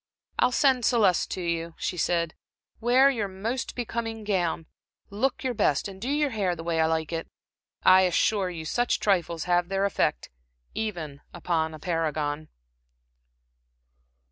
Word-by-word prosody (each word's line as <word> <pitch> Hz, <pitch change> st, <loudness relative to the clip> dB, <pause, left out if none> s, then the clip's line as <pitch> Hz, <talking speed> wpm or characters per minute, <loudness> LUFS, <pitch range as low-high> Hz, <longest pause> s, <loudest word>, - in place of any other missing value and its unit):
"I'll 250 Hz, -, +4 dB
send 260 Hz, -1 st, +3 dB
Celeste 210 Hz, -6 st, +3 dB
to 185 Hz, -, -4 dB
you," 170 Hz, -1 st, -2 dB
she -, -, -2 dB
said. 170 Hz, -1 st, 0 dB, 0.5 s
"Wear 255 Hz, +4 st, +5 dB
your 220 Hz, -6 st, -2 dB
most 220 Hz, +7 st, -4 dB
becoming 225 Hz, -2 st, -4 dB
gown. 175 Hz, -5 st, -1 dB, 0.5 s
Look 245 Hz, +8 st, -1 dB
your 255 Hz, -1 st, 0 dB
best, 150 Hz, -8 st, +1 dB
and 190 Hz, -1 st, -10 dB
do 245 Hz, -, -3 dB
your 290 Hz, -1 st, +1 dB
hair 195 Hz, -6 st, 0 dB
the 165 Hz, -, -8 dB
way 165 Hz, -1 st, -1 dB
I 160 Hz, -, +3 dB
like 160 Hz, 0 st, -1 dB
it. 165 Hz, 0 st, -3 dB, 0.6 s
I 185 Hz, 0 st, +7 dB
assure 195 Hz, +2 st, +1 dB
you, 165 Hz, -3 st, -6 dB
such 245 Hz, +9 st, 0 dB
trifles 170 Hz, -5 st, +1 dB
have 175 Hz, 0 st, +1 dB
their 195 Hz, 0 st, +1 dB
effect 125 Hz, -, 0 dB, 0.4 s
even 165 Hz, -10 st, -4 dB
upon 160 Hz, -2 st, -1 dB
a -, -, -11 dB
paragon." 155 Hz, -2 st, -2 dB
185 Hz, 150 wpm, -27 LUFS, 165-225 Hz, 0.6 s, I